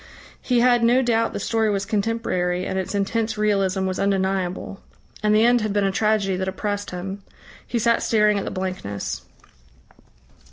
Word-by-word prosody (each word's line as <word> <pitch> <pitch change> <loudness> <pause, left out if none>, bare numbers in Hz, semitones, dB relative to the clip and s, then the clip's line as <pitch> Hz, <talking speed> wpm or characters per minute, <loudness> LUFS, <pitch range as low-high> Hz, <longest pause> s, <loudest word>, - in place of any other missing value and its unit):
He 245 -2 +2
had 240 -1 +4
no 245 +3 +4
doubt 230 -2 +1
the - - -4
story 225 -1 0
was 200 -1 -1
contemporary, 195 -4 -1
and 190 - -2
its 190 +2 -4
intense 220 +3 -1
realism 195 -2 +1
was 185 -1 -2
undeniable. 190 -1 -1 0.4
And 210 0 +3
the 220 +2 +5
end 240 0 +4
had 215 -1 -1
been 205 -1 +1
a 195 - +1
tragedy 210 -2 +1
that 190 0 -2
oppressed 205 +1 -3
him. 190 +2 -6 0.5
He 240 - -2
sat 235 0 +2
staring 210 -2 +3
at - - -4
the - - -3
blankness. 185 - -4
205 Hz, 170 wpm, -23 LUFS, 190-225 Hz, 0.5 s, the